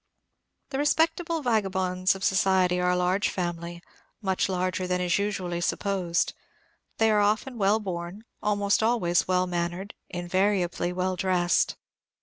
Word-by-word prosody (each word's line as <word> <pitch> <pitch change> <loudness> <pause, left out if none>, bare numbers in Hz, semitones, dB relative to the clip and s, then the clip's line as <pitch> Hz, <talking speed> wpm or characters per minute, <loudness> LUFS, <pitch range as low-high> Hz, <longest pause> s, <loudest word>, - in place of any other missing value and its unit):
The 270 - -2
respectable 325 +2 +1
vagabonds 190 -5 +1
of 195 - -8
society 185 -2 +3
are 180 0 +2
a 180 - +2
large 180 +3 +1
family, 175 -1 -4 0.4
much 190 -2 0
larger 185 0 -1
than 180 0 0
is 180 +1 +1
usually 185 -4 -2
supposed. 180 -2 0 0.6
They 225 0 +3
are 210 -1 +3
often 215 +4 0
well 205 +2 +3
born, 180 0 -5 0.2
almost 205 0 +1
always 190 -6 +2
well 185 0 +2
mannered, 175 +2 -3 0.2
invariably 180 0 0
well 185 +1 -1
dressed. 180 -1 +1
185 Hz, 135 wpm, -27 LUFS, 180-205 Hz, 0.6 s, society